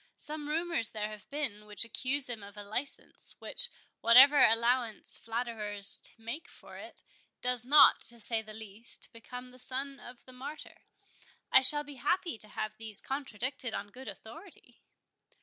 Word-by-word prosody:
Some 300 0 -7
rumours 330 -6 +1
there 210 -1 -4
have 215 -1 -12
been 255 -8 -4
which 210 +1 0
accuse 265 +4 +1
him 235 -3 -5
of 200 +1 -13
a 205 - -7
license, 245 +7 -6
which, - - +4 0.3
whatever 260 +5 +7
allowance 235 0 +2
flatterers 225 -4 -1 0.2
make 230 +8 -7
for - - -15
it, - - -10 0.4
does 250 -1 +3
not, 290 +3 +7
to 235 +1 -6
say 225 +1 +2
the 215 0 -12
least, 220 +1 -4
become 250 +2 -10
the 255 - -14
son 270 +2 -3
of 245 0 -13
the 255 - -14
Martyr—I 265 -1 -3
shall 295 +3 +6
be 290 -2 -11
happy 340 -2 -1
to 215 - 0
have 215 0 -5
these 220 -2 -6
contradicted 255 -2 -4
on 205 0 -6
good 260 +3 -12
authority." 240 - -13
245 Hz, 155 wpm, -31 LUFS, 220-275 Hz, 0.4 s, whatever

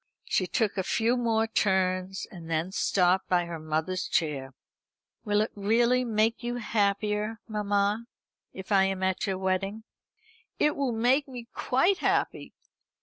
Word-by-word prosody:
She 185 - 0
took 210 -1 0
a - - 0
few 230 +5 +1
more 225 -2 +1
turns, 190 -3 0
and 165 -3 -10
then 165 +3 -1
stopped 185 -1 +2
by 175 -1 +2
her 170 -1 -6
mother's 155 +4 -2
chair. 135 -5 -1 0.7
"Will 210 -1 +2
it 215 - -1
really 235 +5 +2
make 225 -1 +1
you 240 0 -3
happier, 210 -1 0
mamma, 210 +1 0 0.4
if 190 +2 -9
I 195 -1 +5
am 190 -1 -2
at 190 +1 0
your 190 -1 -1
wedding?" 190 +3 -1 0.7
"It 300 - +2
will 275 -3 0
make 250 +6 +2
me 245 -3 -9
quite 350 +10 +2
happy." - - -1
205 Hz, 145 wpm, -28 LUFS, 185-230 Hz, 0.7 s, I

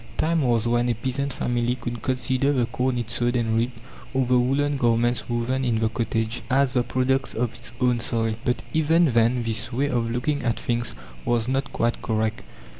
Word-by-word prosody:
Time 165 0 +2
was 120 -4 +2
when 120 +1 +2
a 120 - +1
peasant 130 +4 -2
family 120 -1 0
could 120 -2 -5
consider 130 +2 +1
the 125 -4 +2
corn 125 +1 -1
it 120 -1 -3
sowed 120 +1 0
and 115 -2 +1
reaped, 120 +1 0 0.4
or 130 -1 +2
the 125 0 +3
woolen 140 +3 +1
garments 120 -1 +1
woven 120 +3 0
in 120 -3 +1
the 110 0 +1
cottage, 115 0 -2
as 135 0 +3
the 125 - +3
products 130 +2 0
of 120 0 -1
its 120 - -7
own 125 -1 +2
soil. 115 -1 0
But 125 - 0
even 160 0 +3
then 120 +1 +3
this 115 0 -1
way 135 +4 0
of 120 -2 0
looking 135 +5 -1
at 120 -2 -1
things 120 - -2 0.3
was 120 -1 0
not 135 +1 -1
quite 120 +1 0
correct. 110 -1 -1
120 Hz, 195 wpm, -24 LUFS, 115-130 Hz, 0.4 s, the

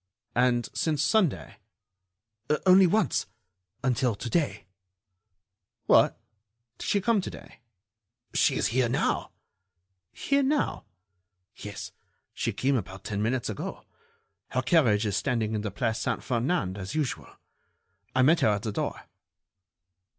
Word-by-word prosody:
"And 120 -1 +2
since 155 -2 0
Sunday?" 175 - +1 1.1
"Only 185 0 +7
once... 215 +5 +1 0.6
until 125 -2 +1
to 120 - -6
day." 165 -4 0 1.2
"What! - - +5 0.6
Did - - -5
she 200 - +2
come 225 -1 +2
to - - -5
day?" - - -12 0.7
"She - - +3
is - - +1
here 120 +1 +1
now." 130 - 0 0.8
"Here 280 0 +1
now?" 285 +2 0 0.7
"Yes, 100 -2 -7 0.4
she - - -1
came 135 +1 +1
about 95 -2 -6
ten 105 0 -3
minutes 120 +3 0
ago. 110 - -6 0.6
Her 130 - -1
carriage 125 -7 +3
is 100 -2 -1
standing 110 -1 0
in 105 - -1
the 105 - -3
Place 110 +3 -2
Saint - - -2
Ferdinand, 120 - -1
as 95 +8 -6
usual. 150 -6 -3 0.8
I 130 - +4
met 160 +5 +5
her - - +3
at 105 0 0
the 110 - -2
door." - - -3
125 Hz, 130 wpm, -27 LUFS, 110-160 Hz, 1.2 s, Only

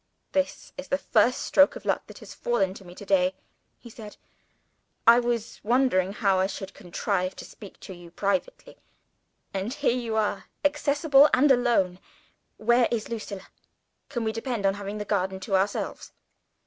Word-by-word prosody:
"This 285 -1 -2
is 275 - -7
the 275 - +1
first 240 -1 +2
stroke 285 +11 +4
of - - -10
luck - - -1
that - - -12
has - - -11
fallen 195 -6 0
to 195 - -12
me 175 -1 -13
to 205 - -10
day," 185 -1 +2 0.4
he - - -14
said. 220 -2 -11 0.9
"I 235 +1 +8
was 240 -2 -2
wondering 230 -6 +2
how 195 -2 +1
I 190 - +2
should 195 0 -7
contrive 185 0 -2
to - - -9
speak 200 -3 -13
to 190 - -9
you 175 -1 -13
privately. 240 - -3 0.8
And 195 +4 -3
here 280 -3 0
you 235 -3 -3
are 210 -3 -1 0.2
accessible 290 0 +4
and 280 +2 +4
alone. 235 -8 +2 0.6
Where 235 +2 +3
is 225 -3 -3
Lucilla? 210 -4 -6 0.6
Can 240 -4 -3
we 220 - 0
depend 225 -2 -3
on 195 - +3
having 200 +1 -6
the 210 - -4
garden 190 -2 -1
to 195 0 -1
ourselves?" 195 +2 -2
215 Hz, 170 wpm, -26 LUFS, 195-245 Hz, 0.9 s, I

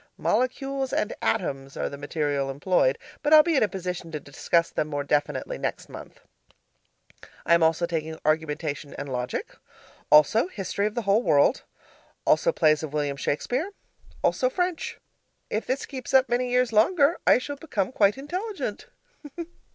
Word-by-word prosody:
Molecules 270 +1 -1
and 210 - -1
Atoms 135 -10 -2
are - - -1
the - - -6
material 145 -1 -2
employed, 180 - +1 0.2
but 305 +1 +5
I'll 305 - +9
be 335 -1 +1
in - - +3
a 215 - +4
position 180 -3 -5
to 155 - -4
discuss 165 +4 0
them 150 - -1
more 145 -2 -3
definitely 150 - -1
next - - -4
month. - - -11 1.2
I - - +4
am 170 - +5
also 160 +1 +3
taking 160 -2 -3
argumentation 155 -1 -1
and 140 - -6
logic. 125 0 -4 0.5
Also 150 - +5
history 200 - -2
of 215 - -6
the 235 - -2
whole 200 +3 +3
world. 150 - +3 0.6
Also - - +3
plays 155 - +3
of 155 -2 -6
William 145 -2 -1
Shakespeare. 245 - -2 0.5
Also - - +2
French. 360 -7 -2 0.5
If 215 - -2
this 265 +2 -1
keeps 265 -1 -4
up 265 0 +6
many 245 +1 0
years 250 -1 +1
longer, 285 - +4
I - - +7
shall 285 +3 -5
become 220 -10 -2
quite 205 -3 +3
intelligent. 370 +10 -5
200 Hz, 160 wpm, -26 LUFS, -, 1.2 s, I'll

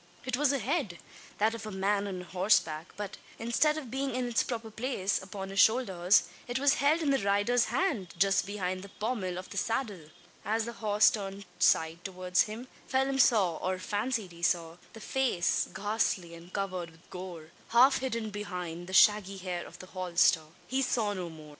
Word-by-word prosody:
It 255 -1 0
was 285 +1 +3
a 280 - +1
head 255 - -1 0.4
that 220 +2 +2
of 230 - -6
the 215 - -6
man 200 +1 0
on 185 -2 -5
horseback; 180 -3 +1
but, 205 -1 -5 0.2
instead 270 +7 +2
of 265 -7 -7
being 270 -1 -2
in 255 -1 -1
its 240 - +2
proper 225 -2 -4
place, 220 -4 -1
upon 195 0 -7
his 195 - -2
shoulders, 195 -6 +4 0.2
it 245 +1 -1
was 280 +1 +4
held 305 +4 +3
in 285 - +2
the 270 - +3
rider's 205 +5 +2
hand, 235 - -1
just 195 +2 +3
behind 185 -2 -3
the 200 - -10
pommel 205 -5 -3
of 185 - -8
the 200 - -6
saddle! 205 - -2 0.3
As 220 +2 0
the 235 - -5
horse 210 -2 +4
turned 200 -1 -5
side 160 +2 +3
towards 185 -1 0
him, 230 +4 -7 0.2
Phelim 270 0 +1
saw, 195 -10 +4
or 185 +3 -2
fancied 210 +1 -2
he 170 0 -13
saw, 165 -1 0 0.2
the 225 - -10
face 245 -8 0
ghastly 200 -4 -1
and 170 +2 -12
covered 185 -4 -3
with 165 +1 -21
gore 175 -3 -8 0.2
half 255 +4 +5
hidden 230 -4 -3
behind 180 -4 -5
the 190 - -8
shaggy 200 -1 +5
hair 180 -2 -4
of 170 - -12
the 185 - -10
holster! 180 -3 +2 0.2
He 265 +1 0
saw 225 -5 0
no 180 -3 -4
more. 155 -2 -12
200 Hz, 190 wpm, -30 LUFS, 180-235 Hz, 0.4 s, half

